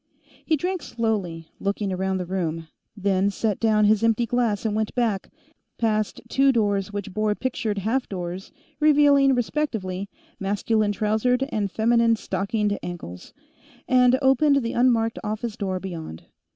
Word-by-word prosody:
He 315 - +1
drank 365 +3 -2
slowly, 200 - -3
looking 200 0 -2
around 190 +1 -1
the 180 - -3
room, 165 -3 -3 0.3
then 195 0 +1
set 210 0 -1
down 215 -2 +3
his 215 +1 +3
empty 230 +1 +2
glass 230 -3 0
and 215 -1 0
went 220 0 -2
back, 225 -6 0 0.5
past 215 -2 0
two 275 0 +3
doors 205 -4 0
which 205 -1 -5
bore 215 0 0
pictured 240 -4 -2
half 225 +7 -1
doors 180 0 -5 0.3
revealing, 285 -3 +5
respectively, 220 -8 -2 0.3
masculine 205 +2 0
trousered 220 +5 +1
and 205 -6 -1
feminine 230 +2 +3
stockinged 205 -1 -2
ankles, 170 - -8 0.6
and 250 0 +5
opened 275 +1 +4
the 230 - -2
unmarked 235 -2 +2
office 215 +1 -3
door 190 -2 -2
beyond. 165 - -7
215 Hz, 140 wpm, -24 LUFS, 195-240 Hz, 0.6 s, revealing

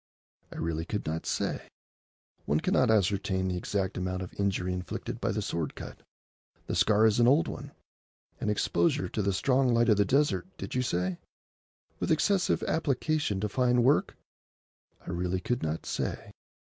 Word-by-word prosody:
"I - - -10
really 80 0 -2
could 105 +4 -3
not 80 +1 -3
say. - - -2 0.8
One 75 - +2
cannot 125 +8 +2
ascertain 100 -2 +1
the 90 - -1
exact 95 +1 -2
amount 95 0 -2
of 90 - -9
injury 95 -2 0
inflicted 90 0 -5
by - - 0
the - - -2
sword 80 -3 -3
cut. - - -9 0.6
The - - -4
scar 110 +1 +4
is 110 +1 +3
an 120 - +5
old 145 +6 +4
one, - - -7 0.7
and—exposure 140 +8 +1
to 110 - -2
the 100 0 +1
strong 125 +5 +2
light 115 0 +3
of 105 - +5
the 100 - +5
desert, 140 - +1
did - - -6
you 125 - +1
say?—with 90 -5 -5
excessive 180 +4 +2
application 150 -7 0
to 105 - 0
fine 125 +2 +2
work? 135 +4 +2 0.9
I - - -5
really 90 +1 -1
could 120 +7 -2
not 80 +1 -3
say?" - - -3
105 Hz, 160 wpm, -29 LUFS, 90-125 Hz, 0.9 s, an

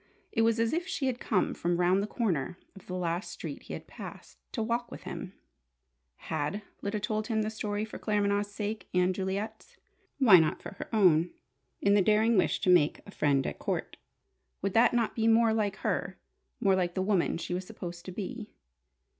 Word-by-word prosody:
It 225 - +1
was 225 0 +3
as 230 +3 +2
if 345 +2 -1
she 300 -7 -2
had 255 -2 0
come 200 -5 +1
from 175 0 0
round 180 +2 +3
the 205 - -2
corner 180 - -1 0.2
of 195 - -14
the 185 - -4
last 175 +1 -2
street - - -6
he - - -9
had - - -6
passed, - - -10
to 225 - -2
walk 235 +2 -1
with - - -9
him. - - -6 0.8
Had 160 - -3 0.2
Lyda 205 +1 -2
told 215 +1 -2
him 220 -2 +1
the 215 - -2
story 210 -1 -2
for 220 - -9
Claremanagh's 205 -1 +1
sake 210 0 -4
and 180 +1 +3
Juliet's? 200 +4 -4 0.4
Why 220 -10 +8
not 155 -1 +1
for - - -8
her - - -6
own 180 -6 +4 0.5
in 200 - +5
the 205 - +5
daring 215 +4 +4
wish 185 - +2
to - - +1
make 160 -4 +4
a 200 - -11
"friend 140 -6 +2
at - - -4
court?" - - -2 0.7
Would 195 -1 0
that 230 +1 +5
not 235 -2 +1
be 225 -1 +1
more 225 0 +5
like 210 -3 0
her - - -2 0.4
more 200 -5 +3
like 175 -2 0
the 185 - +1
woman 190 -5 +1
she 175 - -4
was 180 +1 -3
supposed 175 -5 -7
to 185 - -6
be? 215 +4 -6
205 Hz, 200 wpm, -30 LUFS, 180-220 Hz, 0.8 s, Why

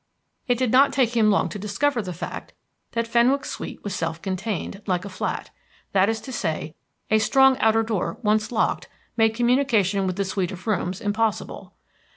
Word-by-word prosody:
It 245 -1 +2
did 250 -2 0
not 275 +2 +6
take 245 -3 +1
him 220 -2 +4
long 200 - +3
to 210 - -6
discover 230 +6 0
the 185 -3 -6
fact 175 - -7 0.4
that 230 0 0
Fenwick's 240 +4 +2
suite - - -7
was 205 - -4
self 165 -3 -3
contained, 195 +1 -4
like 185 -1 0
a - - -6
flat. 185 - -4 0.4
That 195 +1 +3
is 225 0 -1
to 265 - -8
say, 160 -8 -3 0.4
a 220 - +5
strong 265 +4 +5
outer 225 0 +3
door 220 -1 -2
once 215 +1 +1
locked 240 - 0 0.3
made 225 -1 +3
communication 230 -6 +2
with 185 - -2
the 200 0 -1
suite 190 -1 -2
of 185 -1 -9
rooms 190 -4 -1
impossible. 215 +1 -2
215 Hz, 185 wpm, -24 LUFS, 190-235 Hz, 0.4 s, not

